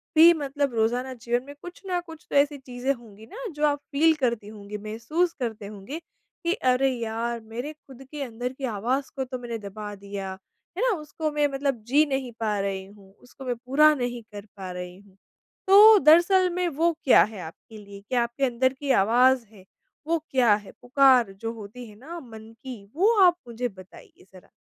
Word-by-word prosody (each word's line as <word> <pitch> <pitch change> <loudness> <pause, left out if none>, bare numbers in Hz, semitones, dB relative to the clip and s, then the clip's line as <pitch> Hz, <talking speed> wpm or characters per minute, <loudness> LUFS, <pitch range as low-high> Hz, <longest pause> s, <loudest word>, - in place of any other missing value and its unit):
भी 330 +2 +9
मतलब 285 -3 -2
रोज़ाना 245 +4 0
जीवन 240 +1 -2
में 285 +2 -11
कुछ 355 0 -10
न 360 -1 0
कुछ 325 -2 -12
तो - - -4
ऐसी 285 +1 +3
चीज़ें 260 0 -3
होंगी 220 -4 -14
ना, 400 - -12
जो 300 -1 0
आप 290 0 0
फ़ील 320 +3 +4
करती 235 -7 -1
होंगी, 210 -1 -8
महसूस 230 - -2
करते 220 -4 -4
होंगे 215 +10 -8
कि, 340 +1 -6
अरे! 260 - +2
यार, 235 -1 -3
मेरे 230 +7 -7
खुद 270 -3 -15
के 300 -1 -6
अंदर 245 0 -5
की 270 0 -5
आवाज़ 250 +7 -1
को 270 - -2
तो 255 0 -6
मैंने 235 -1 -5
दबा 210 0 -7
दिया। 200 -1 -6 0.5
है - - -1
ना? - - +2
उसको 305 +1 -4
मैं 295 0 +2
मतलब 270 -4 -1
जी 290 +5 +4
नहीं 270 -4 -3
पा 210 -3 -1
रही 195 -1 -3
हूँ। 195 -1 -18
उसको 250 +4 -14
मैं 245 - -1
पूरा 300 +4 +5
नहीं 245 -2 -3
कर 205 0 -9
पा 190 -2 -6
रही 180 0 -7
हूँ। 195 -1 -21 0.5
तो 420 +3 +9
दरअसल 345 +5 +5
में 360 0 0
वो 335 +2 +1
क्या 265 - +7
है 215 -2 -6
आपके 175 +7 -11
लिए? 200 -1 -12
क्या 245 -2 +2
आपके 235 +4 -1
अंदर 255 +1 +1
की 275 0 -3
आवाज़ 245 +4 +4
है? 195 -4 -17 0.4
वो 335 0 +1
क्या 245 -5 +4
है? 205 -1 -9
पुकार 255 -4 +4
जो 225 +4 -5
होती 225 +2 -10
है 210 - -15
ना 330 +7 -8
मन 225 -5 -12
की, 250 -6 -8
वो 410 +7 +4
आप 350 -1 +5
मुझे 240 +1 -3
बताइए 185 -2 -16
ज़रा। 185 - -16
250 Hz, 200 wpm, -25 LUFS, 215-290 Hz, 0.5 s, भी